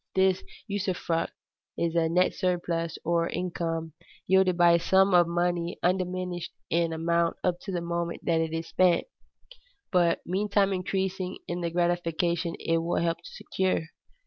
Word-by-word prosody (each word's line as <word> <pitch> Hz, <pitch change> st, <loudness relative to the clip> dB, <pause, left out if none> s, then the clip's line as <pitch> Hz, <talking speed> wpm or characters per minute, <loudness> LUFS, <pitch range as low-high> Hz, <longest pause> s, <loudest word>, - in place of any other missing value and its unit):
This 190 Hz, -1 st, +3 dB, 0.2 s
usufruct 185 Hz, -5 st, -1 dB, 0.5 s
is 170 Hz, -1 st, 0 dB
a 165 Hz, -1 st, +2 dB
net 180 Hz, +2 st, +3 dB
surplus, 170 Hz, -2 st, -1 dB
or 170 Hz, 0 st, +1 dB
income, 165 Hz, -3 st, -3 dB, 0.3 s
yielded 190 Hz, -1 st, +3 dB
by 175 Hz, -1 st, +6 dB
a 170 Hz, -, +5 dB
sum 190 Hz, +2 st, +4 dB
of 175 Hz, -1 st, +6 dB
money 175 Hz, 0 st, -1 dB
undiminished 180 Hz, -1 st, -1 dB, 0.2 s
in 170 Hz, 0 st, +2 dB
amount 170 Hz, +1 st, +1 dB
up 175 Hz, -1 st, +1 dB
to 200 Hz, -, -4 dB
the 175 Hz, -2 st, -2 dB
moment 170 Hz, 0 st, -3 dB
it 165 Hz, -1 st, +1 dB
is 165 Hz, 0 st, -3 dB
spent, 180 Hz, -1 st, +3 dB, 0.9 s
but 175 Hz, -2 st, +3 dB
meantime 200 Hz, +1 st, +1 dB
increasing 185 Hz, 0 st, -2 dB
in 175 Hz, +1 st, -3 dB
the 170 Hz, -, -1 dB
gratification 170 Hz, 0 st, 0 dB
it 165 Hz, 0 st, +1 dB
will 170 Hz, +1 st, -1 dB
help 170 Hz, 0 st, 0 dB
to 170 Hz, -, -12 dB
secure. 190 Hz, -2 st, -1 dB
175 Hz, 145 wpm, -27 LUFS, 170-185 Hz, 0.9 s, by